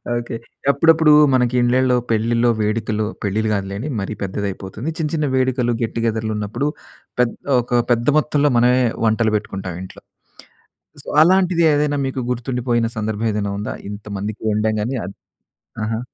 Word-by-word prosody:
Okay. 120 -1 -4 0.4
అప్పుడప్పుడు 160 +1 +5 0.2
మనకి 125 -1 +2
ఇండ్లల్లో 125 +1 +3
పెళ్ళిలో, 115 +2 +2
వేడుకలో 110 0 -1 0.2
పెళ్ళిళ్ళు 110 +2 0
గాదులేండి 100 +7 -3
మరీ 95 - -4
పెద్దదైయిపోతుంది. 100 +5 -4
చిన్న 155 - 0
చిన్న 150 -2 0
వేడుకలు 130 -2 +1
గెట్ 115 - -2
టుగెదర్‌లు 110 -1 -1
ఉన్నప్పుడు 105 +8 -2 0.5
పెద్ 120 -1 +1 0.3
ఒక 120 0 +1
పెద్ద 120 +1 -2
మొత్తంలో 145 -1 +1
మనమే 125 +2 +4 0.2
వంటలు 110 0 +2
పెట్టుకుంటాం 95 -4 -6
ఇంట్లో. 95 - -12 1.0
సో - - -17
అలాంటిది 180 0 +4
ఏదైనా 145 0 +1
మీకు 130 0 -3
గుర్తుండిపోయిన 120 -1 -1
సందర్భం 110 0 -2
ఏదైనా 100 -1 -2
ఉందా? 105 - -4 0.2
ఇంతమందికి 105 0 -6
ఒండాం 110 +1 +1
గాని 125 +5 -2
అద్. 100 - -8 0.7
ఆహా! 110 +1 -2
115 Hz, 140 wpm, -20 LUFS, 105-130 Hz, 1.0 s, అప్పుడప్పుడు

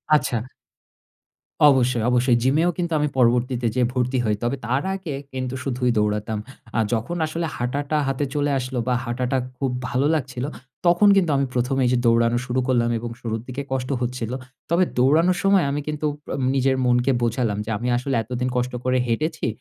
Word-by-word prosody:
আচ্ছা। 125 -5 +1 1.3
অবশ্যই, 125 -4 +3
অবশ্যই 125 0 +3
জিমেও 155 +7 +3
কিন্তু 175 -1 -2
আমি 150 - +2
পরবর্তীতে 125 0 +2
যেয়ে 125 -2 +3
ভর্তি 125 0 0
হই। 105 -1 +2
তবে 120 +3 0
তার 130 +5 0
আগে 185 -6 -5 0.2
কিন্তু 130 -1 -3
শুধুই 125 -2 0
দৌড়াতাম। 105 +1 0 0.4
আ - - +3
যখন 120 +10 -2
আসলে 165 +2 -3
হাঁটাটা 140 +5 -1
হাতে 135 +1 0
চলে 145 0 +1
আসলো 130 0 -3
বা 125 - +2
হাঁটাটা 125 +2 -1 0.2
খুব 135 -2 -1 0.2
ভালো 130 +3 0
লাগছিলো 130 -2 -3 0.4
তখন 175 +4 +5
কিন্তু 180 -5 +3
আমি 135 - +2
১মে 125 +2 0
এইযে 125 0 +2
দৌড়ানো 115 0 +3
শুরু 125 0 -1
করলাম 120 -2 +2
এবং 120 +1 -5
শুরুর 110 -1 -3
দিকে 130 +2 -4
কষ্ট 130 -1 -2
হচ্ছিল। 125 -2 -3 0.4
তবে 170 +3 +3
দৌড়ানোর 160 +8 +4
সময় 195 -1 +4
আমি 145 +1 -1
কিন্তু 150 0 -3 0.3
আম 135 - -2
নিজের 135 0 +2
মনকে 125 +2 +3
বোঝালাম 115 -3 0
যে - - -6
আমি 120 +4 -3
আসলে 135 +2 -2
এতদিন 125 +2 -3
কষ্ট 125 +1 -1
করে 130 0 +2
হেঁটেছি। 155 +7 -1
125 Hz, 175 wpm, -23 LUFS, 120-145 Hz, 1.3 s, তখন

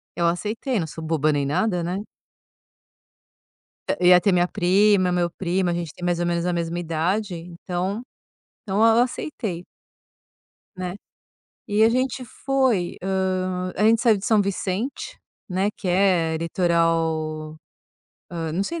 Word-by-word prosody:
Eu 170 -1 +1
aceitei, 215 +7 -1
não 160 - -2
sou 160 +1 -8
boba 155 -1 +1
nem 145 -1 0
nada, 180 +5 0
né. 180 +4 -2 1.9
Eh, 180 - +2
ia 180 -1 +8
ter 200 - +3
minha 175 0 +3
prima, 190 0 +3
meu 175 -1 +1
primo, 180 0 -1
a - - 0
gente 170 -3 -4
tem 175 - -7
mais 175 -1 0
ou 175 - 0
menos 170 0 0
a 180 - 0
mesma 170 0 -2
idade, 175 +4 -1
então 180 +4 -4 0.7
então 205 +4 +3
eu 230 +1 +6
aceitei 215 - -4 1.1
né. 185 0 -4 0.7
E 210 +1 +3
a 225 - +6
gente 255 +1 -1
foi, 255 -9 0
hã, 185 -1 -1
a 210 - 0
gente 225 +1 +4
saiu 225 -4 +4
de 195 - -6
São 215 -2 +4
Vicente, 200 +5 -3 0.3
né, 190 +3 +1
que 190 - -5
é 175 -3 +2
litoral 165 -2 0 0.7
hã, 165 -2 -4
não 190 +4 0
sei 335 +10 -4
180 Hz, 150 wpm, -23 LUFS, 170-205 Hz, 1.9 s, ia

